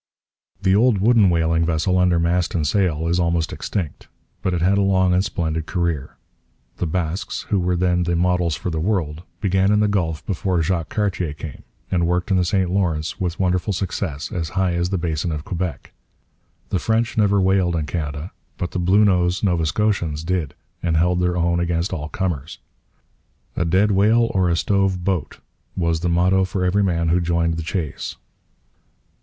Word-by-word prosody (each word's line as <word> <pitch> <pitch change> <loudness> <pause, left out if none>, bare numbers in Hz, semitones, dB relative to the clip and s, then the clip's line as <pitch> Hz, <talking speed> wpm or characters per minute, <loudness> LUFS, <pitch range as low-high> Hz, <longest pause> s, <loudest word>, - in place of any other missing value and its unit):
The 95 0 +2
old 115 +1 +4
wooden 105 0 +4
whaling 85 -1 +2
vessel 85 +3 +1
under 90 -1 +3
mast 85 +1 0
and 80 -3 0
sail 80 -2 +1
is 85 +2 +1
almost 85 -1 0
extinct. 90 -8 -4 0.3
But 90 -1 0
it 85 - -2
had 100 +2 +3
a - - +3
long 95 -2 +3
and 90 +1 +3
splendid 80 -5 -2
career. 85 -6 -2 0.6
The 90 - -1
Basques, 85 +2 -3
who 100 - +2
were 90 0 0
then 90 0 +1
the 85 0 0
models 90 -2 +1
for 90 +5 -4
the 80 - -2
world, 80 -4 -1 0.2
began 95 0 +2
in 105 - +3
the 105 - +3
Gulf 85 -6 -1
before 90 -3 0
Jacques 85 -2 -1
Cartier 95 -7 -1
came; 75 -2 -8 0.3
and 85 -2 +1
worked 90 +2 0
the 90 - +3
St 90 0 0
Lawrence 85 -5 -1
with 90 -2 -2
wonderful 90 +2 +1
success 90 -5 -3
as 80 -2 -3
high 95 -2 +2
as 85 +1 0
the 95 - 0
basin 80 -1 -2
of 75 -1 -4
Quebec. 90 -5 -4 0.8
The 95 - 0
French 110 +5 0
never 100 -2 +3
whaled 95 -2 +2
in 80 -2 -1
Canada; 75 +1 -4 0.3
but 85 - -3
the 90 - -3
'Bluenose' 90 -1 +3
Nova 85 -5 +1
Scotians 85 -6 0
did, 85 -4 -2 0.3
and 80 -2 +1
held 90 +2 +2
their 90 0 +1
own 85 0 +1
against 85 +1 -1
all 75 -3 -4
comers. 85 -6 -3 1.0
'A - - 0
dead 95 +5 +3
whale 110 +4 +3
or 95 -2 +2
a 85 - +2
stove 95 0 +1
boat' 95 -3 -2 0.4
was 85 -2 +1
the 85 +1 -1
motto 90 +3 +3
for 95 0 -1
every 95 +3 +2
man 85 -3 +1
who 90 +2 +2
joined 85 -1 +1
the 80 - -3
chase. 80 -2 -4
90 Hz, 185 wpm, -21 LUFS, 85-95 Hz, 1.0 s, old